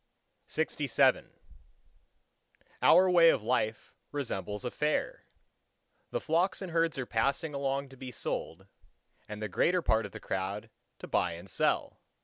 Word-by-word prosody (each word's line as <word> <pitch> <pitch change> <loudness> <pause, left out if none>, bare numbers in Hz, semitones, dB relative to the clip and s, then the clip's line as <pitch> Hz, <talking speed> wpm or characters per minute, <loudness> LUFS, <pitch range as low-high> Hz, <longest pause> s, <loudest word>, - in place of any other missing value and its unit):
LXVIII - - +2 1.5
Our 185 +1 +7
way 170 -2 +7
of 110 - +2
life 110 -2 -1 0.2
resembles 105 -6 -4
a 125 - -2
fair. 150 0 -1 0.8
The - - -2
flocks 170 +4 +1
and 185 - -6
herds 165 -2 +1
are 130 - -2
passing 140 +7 0
along 140 0 -2
to 135 - -14
be 130 0 -7
sold, 95 -5 -4 0.6
and 105 0 -6
the - - -1
greater 175 - +1
part 110 -1 +2
of - - -18
the - - -8
crowd 95 +2 -4 0.3
to - - -9
buy 90 -1 +1
and 85 +3 -10
sell. 80 - 0
130 Hz, 140 wpm, -30 LUFS, 105-160 Hz, 1.5 s, Our